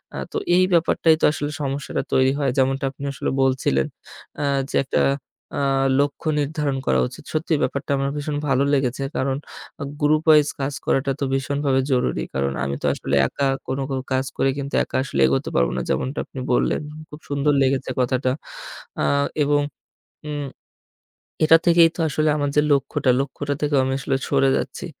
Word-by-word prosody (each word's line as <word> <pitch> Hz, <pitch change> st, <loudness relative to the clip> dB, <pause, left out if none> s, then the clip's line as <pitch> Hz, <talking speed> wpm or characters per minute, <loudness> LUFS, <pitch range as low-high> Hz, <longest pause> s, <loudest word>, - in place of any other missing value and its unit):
আ -, -, -5 dB
তো -, -, -3 dB, 0.2 s
এই 185 Hz, -, +5 dB
ব্যাপারটাই 165 Hz, -1 st, +4 dB
তো -, -, +5 dB
আসলে 145 Hz, -1 st, -3 dB
সমস্যাটা 140 Hz, 0 st, -2 dB
তৈরি 130 Hz, 0 st, +4 dB
হয়। 140 Hz, -2 st, +1 dB
যেমনটা 135 Hz, +1 st, +1 dB
আপনি 140 Hz, -, -11 dB
আসলে 130 Hz, -, -2 dB
বলছিলেন 130 Hz, -, +1 dB, 0.5 s
আ -, -, 0 dB, 0.3 s
যে -, -, -4 dB
একটা 135 Hz, -, 0 dB, 0.6 s
আ -, -, 0 dB, 0.4 s
লক্ষ্য 145 Hz, +2 st, -1 dB
নির্ধারণ 145 Hz, -1 st, -1 dB
করা -, -, +3 dB
উচিত। 125 Hz, -, -11 dB
সত্যিই 160 Hz, -1 st, 0 dB
ব্যাপারটা 140 Hz, +2 st, -2 dB
আমার 135 Hz, 0 st, 0 dB
ভীষণ 145 Hz, 0 st, -3 dB
ভালো 135 Hz, 0 st, +2 dB
লেগেছে। 135 Hz, 0 st, 0 dB
কারণ 135 Hz, 0 st, 0 dB, 0.6 s
গ্রুপ 155 Hz, +1 st, +3 dB
ওয়াইজ 150 Hz, -1 st, +6 dB
কাজ 135 Hz, +1 st, -2 dB
করাটা 135 Hz, 0 st, +1 dB
তো -, -, -1 dB
ভীষণভাবে 135 Hz, 0 st, +1 dB
জরুরি। 125 Hz, -1 st, +1 dB
কারণ 70 Hz, 0 st, -1 dB
আমি 70 Hz, +1 st, -2 dB
তো -, -, -3 dB
আসলে -, -, -2 dB
একা 140 Hz, -, -1 dB, 0.2 s
কোনো 135 Hz, +1 st, -2 dB
কো 135 Hz, -, -1 dB, 0.2 s
কাজ 130 Hz, +1 st, +1 dB
করে 135 Hz, -, +2 dB
কিন্তু 140 Hz, 0 st, -5 dB
একা -, -, -3 dB
আসলে 70 Hz, -, -2 dB
এগোতে -, -, 0 dB
পারব 60 Hz, -1 st, +3 dB
না। 65 Hz, -, 0 dB
যেমনটা 130 Hz, -, -1 dB
আপনি 130 Hz, -, -9 dB
বললেন। 125 Hz, -, +1 dB, 0.3 s
খুব 150 Hz, -, -10 dB
সুন্দর 145 Hz, +1 st, +1 dB
লেগেছে 135 Hz, 0 st, +1 dB
কথাটা। 130 Hz, 0 st, +1 dB, 0.7 s
আ -, -, +1 dB, 0.4 s
এবং 145 Hz, 0 st, +2 dB, 0.7 s
উম 145 Hz, -1 st, -3 dB, 1.0 s
এটা 160 Hz, +1 st, +7 dB
থেকেই 170 Hz, -1 st, +6 dB
তো -, -, -12 dB
আসলে 155 Hz, +2 st, +1 dB
আমার 145 Hz, -1 st, 0 dB
যে 150 Hz, -, +5 dB
লক্ষ্যটা, 135 Hz, -2 st, +2 dB
লক্ষ্যটা 145 Hz, +1 st, -3 dB
থেকে 150 Hz, 0 st, +1 dB
আমি 130 Hz, 0 st, -1 dB
আসলে 135 Hz, 0 st, -1 dB
সরে 135 Hz, -, +3 dB
যাচ্ছি। -, -, -4 dB
140 Hz, 175 wpm, -22 LUFS, 130-145 Hz, 1.0 s, এটা